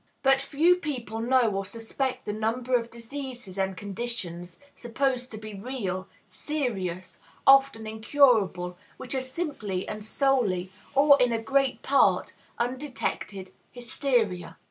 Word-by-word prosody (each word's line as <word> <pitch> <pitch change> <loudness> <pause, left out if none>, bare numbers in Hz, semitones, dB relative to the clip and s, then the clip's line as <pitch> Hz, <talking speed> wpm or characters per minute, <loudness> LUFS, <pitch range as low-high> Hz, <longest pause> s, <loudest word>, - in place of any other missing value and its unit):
But 270 0 +5
few 320 +6 +3
people 250 -9 -4
know 240 -1 +3
or 195 0 -2
suspect 230 +6 -4
the 210 - -2
number 235 +4 0
of 235 -1 0
diseases 240 -3 -8
and 190 -1 -1
conditions, 195 -5 -3 0.2
supposed 250 +1 -1
to 215 - -8
be 215 0 -8
real, 195 -4 -4 0.2
serious, 195 - -4 0.3
often 270 -5 +5
incurable, 215 -6 +2 0.2
which 260 0 -3
are 265 - +1
simply 260 - -3
and 215 0 -5
solely, 215 -7 +1 0.2
or 280 0 +6
in 245 -1 +4
a 230 - 0
great 270 +4 +1
part, 280 0 +3 0.2
undetected 245 -6 -3 0.2
hysteria. 240 - -1
235 Hz, 125 wpm, -27 LUFS, 200-270 Hz, 0.3 s, or